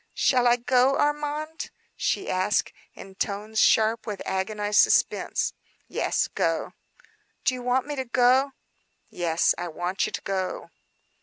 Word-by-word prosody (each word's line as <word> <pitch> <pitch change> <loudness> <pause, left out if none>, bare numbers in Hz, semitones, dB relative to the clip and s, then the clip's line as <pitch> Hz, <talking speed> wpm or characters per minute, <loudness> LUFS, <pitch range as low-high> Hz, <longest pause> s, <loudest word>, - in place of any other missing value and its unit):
"Shall 250 -2 +3
I 240 - +5
go, 250 +2 +2
Armand?" 295 +2 -2 0.3
she 390 - -1
asked 185 +3 0 0.2
in 195 - -11
tones 210 +3 -3
sharp 220 +1 +3
with 205 -3 -4
agonized 205 +2 0
suspense. - - +2 0.3
"Yes, - - 0
go." - - -1 0.7
"Do 255 - +3
you 250 - -5
want 250 +1 +1
me 295 0 -4
to 265 -1 -3
go?" 255 +3 +3 0.6
"Yes, 170 -1 +1
I 175 - -3
want 175 +5 -2
you - - -7
to - - -4
go." 190 -1 -3
230 Hz, 140 wpm, -25 LUFS, 195-260 Hz, 0.7 s, I